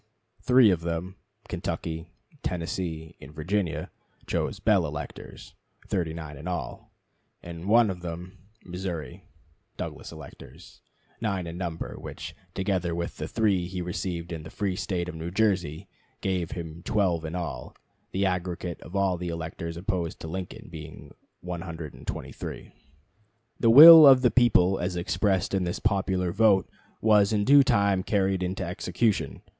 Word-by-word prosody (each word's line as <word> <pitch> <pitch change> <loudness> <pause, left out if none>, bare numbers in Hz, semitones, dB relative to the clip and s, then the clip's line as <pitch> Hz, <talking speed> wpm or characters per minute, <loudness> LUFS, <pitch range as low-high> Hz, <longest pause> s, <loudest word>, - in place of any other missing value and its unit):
Three 125 -4 +6
of 85 -3 0
them 85 +3 -4 0.3
Kentucky, 80 +1 -4 0.3
Tennessee, 80 -2 -4
and 65 - -11
Virginia 90 +3 -2 0.3
chose - - -2
Bell 100 -7 +3
electors, 75 0 -8 0.4
39 80 -4 -3
in 75 +5 -8
all; 90 -1 -5 0.5
and 85 +1 -8
one 115 -1 +5
of 90 -2 -8
them 90 +2 -7 0.3
Missouri 90 -6 -6 0.5
Douglas - - -6
electors, - - -13 0.4
9 100 -5 -1
in 85 0 -6
number, 85 -2 -5
which, - - -8 0.2
together 95 -3 -1
with 85 0 -4
the - - -4
3 100 -6 +1
he 90 0 -5
received 85 -1 -4
in 80 -2 -5
the 80 - -10
free 100 0 -2
State 90 -2 -2
of 90 - -5
New 80 +1 -5
Jersey, 90 -4 0 0.3
gave 90 -3 -1
him 85 -1 -7
12 90 -5 0
in 80 +2 -5
all: 85 -2 -5 0.4
the 95 +1 0
aggregate 90 -2 -3
of 90 - -10
all 95 -2 +1
the 90 0 -4
electors 85 0 -5
opposed 90 -2 -3
to - - -6
Lincoln 90 +2 -6
being 80 -2 -10 0.3
123. 85 -3 -7 0.9
The 115 - +4
will 155 +5 +12
of 130 -1 +7
the 125 - +5
people 95 -6 +4
as 90 0 -2
expressed 95 +2 0
in 95 -1 +1
this 85 0 -2
popular 95 -2 0
vote 100 -1 +4 0.3
was 105 -2 +4
in 105 -2 +1
due 140 +2 +8
time 100 -6 +2
carried 95 -1 0
into 95 +1 -2
execution. 90 +5 -1
90 Hz, 145 wpm, -27 LUFS, 85-100 Hz, 0.9 s, will